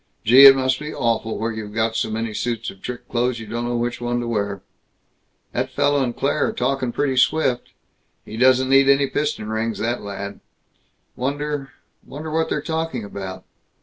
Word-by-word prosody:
Gee, 130 Hz, +5 st, +10 dB
it 135 Hz, -, +9 dB
must 130 Hz, 0 st, 0 dB
be 150 Hz, 0 st, -6 dB
awful 115 Hz, -1 st, -1 dB
where 115 Hz, +2 st, -2 dB
you've 110 Hz, -1 st, -7 dB
got 110 Hz, 0 st, 0 dB
so -, -, 0 dB
many 110 Hz, 0 st, -3 dB
suits 115 Hz, +1 st, -3 dB
of 95 Hz, -, -18 dB
trick 125 Hz, 0 st, -7 dB
clothes 120 Hz, 0 st, 0 dB
you 110 Hz, -, -7 dB
don't 120 Hz, +2 st, -4 dB
know 120 Hz, 0 st, -1 dB
which 120 Hz, +1 st, -2 dB
one 120 Hz, 0 st, -1 dB
to 120 Hz, -, -3 dB
wear. 100 Hz, -4 st, -2 dB, 0.9 s
"That -, -, -2 dB
fellow 145 Hz, 0 st, +1 dB
and 120 Hz, -2 st, -3 dB
Claire 145 Hz, +2 st, +1 dB
are -, -, -3 dB
talking 130 Hz, 0 st, -1 dB
pretty 135 Hz, +1 st, 0 dB
swift. 130 Hz, -2 st, +1 dB, 0.5 s
He 110 Hz, -, -8 dB
doesn't 130 Hz, +2 st, +4 dB
need 135 Hz, 0 st, +6 dB
any 140 Hz, 0 st, +5 dB
piston 145 Hz, -6 st, -2 dB
rings, 110 Hz, +1 st, -2 dB
that 120 Hz, +2 st, -2 dB
lad. 100 Hz, 0 st, -6 dB, 0.8 s
Wonder 145 Hz, +1 st, -3 dB, 0.3 s
wonder 155 Hz, +2 st, -8 dB
what 160 Hz, 0 st, 0 dB
they're 150 Hz, -, -2 dB
talking 160 Hz, -7 st, -3 dB
about? 95 Hz, -2 st, -7 dB
120 Hz, 185 wpm, -22 LUFS, 110-135 Hz, 0.9 s, Gee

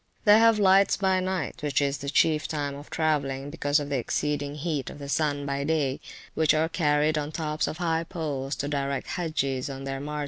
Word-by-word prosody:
They 210 Hz, +1 st, +7 dB
have 225 Hz, -1 st, +5 dB
lights 195 Hz, -1 st, +4 dB
by 190 Hz, -1 st, +2 dB
night 185 Hz, -5 st, -3 dB
(which 145 Hz, -2 st, +1 dB
is 140 Hz, -1 st, 0 dB
the 140 Hz, +1 st, -4 dB
chief 155 Hz, +1 st, +2 dB
time 145 Hz, -2 st, -3 dB
of 145 Hz, +1 st, -10 dB
travelling, 145 Hz, -3 st, -1 dB
because 145 Hz, -1 st, +1 dB
of 145 Hz, -1 st, -5 dB
the 140 Hz, -2 st, 0 dB
exceeding 145 Hz, +3 st, -2 dB
heat 150 Hz, -3 st, -3 dB
of -, -, -9 dB
the 140 Hz, -1 st, -8 dB
sun 145 Hz, -1 st, 0 dB
by 140 Hz, 0 st, -2 dB
day), 145 Hz, -3 st, 0 dB, 0.3 s
which 155 Hz, -1 st, +3 dB
are 160 Hz, +1 st, +1 dB
carried 150 Hz, -2 st, +2 dB
on 145 Hz, -, -3 dB
the -, -, -12 dB
tops 155 Hz, -2 st, -1 dB
of 155 Hz, -, -4 dB
high 165 Hz, -1 st, 0 dB
poles, 145 Hz, -5 st, -3 dB
to 145 Hz, -, -3 dB
direct 140 Hz, -1 st, -2 dB
the -, -, -7 dB
Hagges 140 Hz, -5 st, -1 dB
on 135 Hz, 0 st, -6 dB
their 135 Hz, 0 st, -4 dB
march. 150 Hz, +2 st, -4 dB
150 Hz, 220 wpm, -26 LUFS, 140-160 Hz, 0.3 s, They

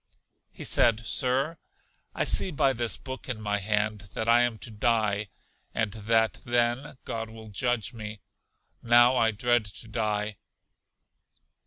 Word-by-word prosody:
He -, -, -8 dB
said, 115 Hz, 0 st, +3 dB
Sir, 135 Hz, +7 st, 0 dB, 0.6 s
I -, -, +1 dB
see -, -, +3 dB
by 135 Hz, -4 st, +2 dB
this 120 Hz, -1 st, 0 dB
book 130 Hz, 0 st, -8 dB
in 120 Hz, -4 st, -2 dB
my 105 Hz, -1 st, -1 dB
hand 105 Hz, 0 st, -1 dB
that 110 Hz, -, -2 dB
I 120 Hz, +1 st, +6 dB
am 120 Hz, -2 st, +1 dB
to 115 Hz, -, -8 dB
die, 105 Hz, -2 st, +1 dB, 0.5 s
and 105 Hz, -2 st, 0 dB
that 110 Hz, -1 st, +1 dB
then 120 Hz, +3 st, 0 dB
God 115 Hz, -1 st, -4 dB
will 110 Hz, -1 st, -11 dB
judge 120 Hz, +2 st, -1 dB
me. 110 Hz, -2 st, -7 dB, 0.6 s
Now 120 Hz, +2 st, +6 dB
I 115 Hz, -2 st, +3 dB
dread 120 Hz, +2 st, +2 dB
to 105 Hz, +2 st, -10 dB
die. 105 Hz, -2 st, -2 dB
115 Hz, 145 wpm, -27 LUFS, 105-120 Hz, 0.6 s, I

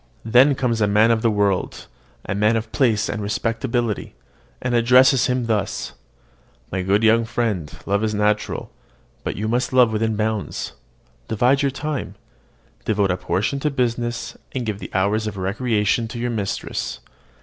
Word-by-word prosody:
Then 130 Hz, +5 st, +5 dB
comes 120 Hz, -4 st, 0 dB
a 105 Hz, -, +4 dB
man 105 Hz, +3 st, +4 dB
of 115 Hz, -1 st, +2 dB
the 115 Hz, -, +3 dB
world, 100 Hz, -3 st, 0 dB, 0.4 s
a -, -, -2 dB
man 105 Hz, +3 st, +2 dB
of 110 Hz, 0 st, -3 dB
place 115 Hz, -7 st, +2 dB
and 110 Hz, -, -3 dB
respectability, 115 Hz, -, -2 dB, 0.4 s
and 125 Hz, -1 st, -2 dB
addresses 125 Hz, +3 st, +5 dB
him 125 Hz, -1 st, 0 dB
thus: 110 Hz, -4 st, -2 dB, 0.8 s
"My 95 Hz, -, -1 dB
good 100 Hz, +4 st, +2 dB
young 115 Hz, +1 st, +5 dB
friend, 110 Hz, -9 st, -2 dB
love 100 Hz, +2 st, 0 dB
is 110 Hz, -1 st, 0 dB
natural; 105 Hz, 0 st, 0 dB, 0.5 s
but -, -, -3 dB
you 105 Hz, +2 st, -3 dB
must 120 Hz, +3 st, 0 dB
love 125 Hz, -3 st, +4 dB
within 110 Hz, 0 st, 0 dB
bounds. 110 Hz, -1 st, -2 dB, 0.5 s
Divide 125 Hz, +5 st, +2 dB
your 140 Hz, -, +2 dB
time: 145 Hz, +1 st, -4 dB, 0.7 s
devote 100 Hz, -3 st, +1 dB
a 90 Hz, -, 0 dB
portion 105 Hz, +9 st, -1 dB
to 150 Hz, -, 0 dB
business, 120 Hz, -3 st, -2 dB, 0.2 s
and 125 Hz, -2 st, -2 dB
give 105 Hz, -2 st, -3 dB
the -, -, -7 dB
hours 105 Hz, +3 st, +1 dB
of 100 Hz, -2 st, -5 dB
recreation 105 Hz, +3 st, 0 dB
to 110 Hz, -, -7 dB
your 120 Hz, +1 st, -2 dB
mistress. 105 Hz, -4 st, -3 dB
110 Hz, 160 wpm, -22 LUFS, 105-120 Hz, 0.8 s, Then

